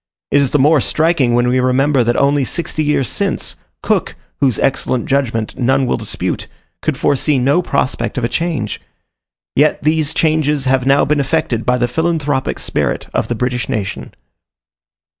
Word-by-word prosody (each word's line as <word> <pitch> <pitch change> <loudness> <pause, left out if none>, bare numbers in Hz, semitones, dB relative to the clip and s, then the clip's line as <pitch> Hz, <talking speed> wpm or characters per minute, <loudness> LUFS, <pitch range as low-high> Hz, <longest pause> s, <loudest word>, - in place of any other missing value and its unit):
It 145 - +4
is 140 - +1
the 150 - +1
more 145 +1 +4
striking 155 -7 +2
when 120 0 +2
we 125 +1 +2
remember 130 +1 +2
that 120 +1 +1
only 140 0 +2
sixty 155 +3 -1
years 145 -4 +1
since, - - -1 0.3
Cook, - - 0 0.2
whose 130 -5 +2
excellent 130 -2 0
judgment 120 -5 -1
none 130 +2 +2
will 125 - 0
dispute, - - -3 0.3
could - - -1
foresee 145 +1 +1
no 140 +7 +2
prospect 140 -5 -2
of 125 - -1
a - - +2
change. 165 +4 -3 0.7
Yet 150 +1 +2
these 155 0 +1
changes 150 -3 +1
have 130 0 +1
now 140 +1 +4
been 150 +1 +1
effected 135 -4 -1
by 125 0 +3
the 120 0 +1
philanthropic 150 -1 -1
spirit - - -2
of - - 0
the 120 - -2
British 125 +1 -2
nation. 100 -3 -4
135 Hz, 165 wpm, -16 LUFS, 125-150 Hz, 0.7 s, It